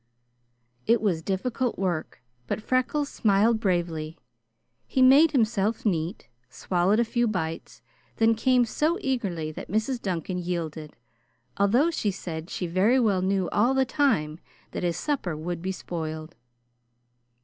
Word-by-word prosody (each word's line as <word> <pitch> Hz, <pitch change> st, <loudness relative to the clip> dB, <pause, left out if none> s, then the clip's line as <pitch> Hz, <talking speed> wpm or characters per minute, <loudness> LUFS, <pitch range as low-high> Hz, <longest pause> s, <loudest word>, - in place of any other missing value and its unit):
It 230 Hz, 0 st, +4 dB
was 185 Hz, -7 st, 0 dB
difficult 235 Hz, +7 st, -2 dB
work, 175 Hz, -8 st, -3 dB, 0.2 s
but -, -, -2 dB
Freckles 255 Hz, +5 st, 0 dB
smiled 220 Hz, -1 st, +2 dB
bravely. 170 Hz, -5 st, -1 dB, 0.7 s
He 260 Hz, -, +2 dB
made 280 Hz, +5 st, +7 dB
himself 225 Hz, -5 st, +1 dB
neat, 170 Hz, -, -1 dB, 0.2 s
swallowed 180 Hz, -, +1 dB
a 235 Hz, -, +3 dB
few 240 Hz, +1 st, 0 dB
bites, 160 Hz, -, -4 dB, 0.3 s
then 225 Hz, 0 st, +4 dB
came 250 Hz, +2 st, +3 dB
so 310 Hz, +9 st, 0 dB
eagerly 200 Hz, -, -2 dB
that -, -, -9 dB
Mrs. 220 Hz, +6 st, -1 dB
Duncan 180 Hz, -1 st, -3 dB
yielded, 165 Hz, -4 st, -4 dB, 0.6 s
although 240 Hz, +12 st, +3 dB
she 220 Hz, -10 st, -1 dB
said 165 Hz, -4 st, -6 dB
she 180 Hz, -, -3 dB
very 190 Hz, +9 st, +3 dB
well 205 Hz, -6 st, +2 dB
knew 190 Hz, -1 st, 0 dB
all 240 Hz, +6 st, +2 dB
the 265 Hz, 0 st, +3 dB
time 225 Hz, -, +1 dB, 0.3 s
that -, -, -4 dB
his 175 Hz, -1 st, -1 dB
supper 185 Hz, -, -2 dB
would 170 Hz, +2 st, -4 dB
be 190 Hz, +2 st, -2 dB
spoiled. 160 Hz, -3 st, -6 dB
195 Hz, 140 wpm, -26 LUFS, 170-240 Hz, 0.7 s, made